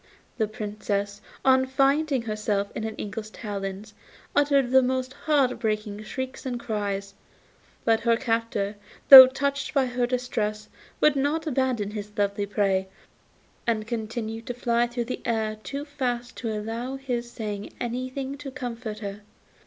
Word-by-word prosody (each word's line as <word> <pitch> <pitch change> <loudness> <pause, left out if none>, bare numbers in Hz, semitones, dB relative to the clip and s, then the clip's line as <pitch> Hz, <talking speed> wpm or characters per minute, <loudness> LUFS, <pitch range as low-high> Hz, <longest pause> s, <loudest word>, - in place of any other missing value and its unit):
The 220 - +2
Princess, 205 -2 -3 0.2
on 260 0 +5
finding 275 0 +2
herself 210 -2 -1
in 220 - -4
an 220 - -5
eagle's 215 +1 -5
talons, 205 -1 -6 0.4
uttered 280 -3 +3
the 265 0 +7
most 255 0 -1
heart 285 -5 +1
breaking 215 -2 -2
shrieks 260 +4 -5
and 250 -2 -3
cries; 200 -3 -3 0.7
but 225 -1 +4
her 230 0 +2
captor, 225 -4 -1 0.3
though 260 -2 +14
touched 280 +2 -2
by 275 -2 +4
her 245 -1 0
distress, 220 -4 -2 0.3
would 300 -1 +5
not 290 +4 0
abandon 255 -7 0
his 210 -1 -7
lovely 200 0 0
prey, 195 -2 +1 0.8
and 220 -2 +1
continued 225 0 -4
to 245 - -3
fly 240 0 +1
through 240 0 -3
the 250 - -5
air 220 -2 -1
too 280 +5 -5
fast 250 -4 -3
to 230 -3 -3
allow 225 +5 -4
of 270 - -9
his 240 -3 -3
saying 210 -3 -5
anything 255 +3 -4
to 290 -1 -6
comfort 235 -4 -5
her. 200 0 -6
235 Hz, 150 wpm, -26 LUFS, 210-260 Hz, 0.8 s, though